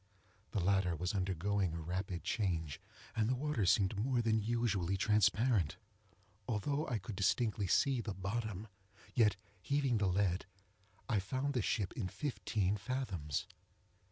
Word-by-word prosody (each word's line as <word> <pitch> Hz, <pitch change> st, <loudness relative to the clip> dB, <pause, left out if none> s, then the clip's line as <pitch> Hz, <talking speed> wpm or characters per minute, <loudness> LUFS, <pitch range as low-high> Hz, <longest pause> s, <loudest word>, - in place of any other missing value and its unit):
The -, -, -1 dB
latter 95 Hz, -1 st, +2 dB
was 90 Hz, +4 st, -2 dB
undergoing 95 Hz, -1 st, 0 dB
a -, -, -3 dB
rapid 90 Hz, +2 st, -3 dB
change, 80 Hz, -, -1 dB, 0.3 s
and 110 Hz, 0 st, +2 dB
the 130 Hz, -, +2 dB
water 140 Hz, -7 st, 0 dB
seemed 95 Hz, +1 st, +4 dB
more 120 Hz, +1 st, +1 dB
than 110 Hz, -1 st, +3 dB
usually 105 Hz, -5 st, 0 dB
transparent. 105 Hz, -, +3 dB, 0.7 s
Although 140 Hz, +7 st, 0 dB
I 120 Hz, -, 0 dB
could 100 Hz, +1 st, -6 dB
distinctly 105 Hz, +1 st, +1 dB
see 130 Hz, +6 st, +3 dB
the 105 Hz, -3 st, -4 dB
bottom, 105 Hz, +1 st, -3 dB, 0.5 s
yet, 105 Hz, -5 st, +4 dB, 0.3 s
heaving 135 Hz, +1 st, +1 dB
the 100 Hz, -, +2 dB
lead, 95 Hz, 0 st, +1 dB, 0.6 s
I 110 Hz, -, +2 dB
found 130 Hz, +9 st, -1 dB
the 125 Hz, -, +1 dB
ship 100 Hz, -2 st, 0 dB
in 100 Hz, -, -2 dB
fifteen 105 Hz, -2 st, -1 dB
fathoms. 100 Hz, -, -2 dB
105 Hz, 140 wpm, -35 LUFS, 95-120 Hz, 0.7 s, seemed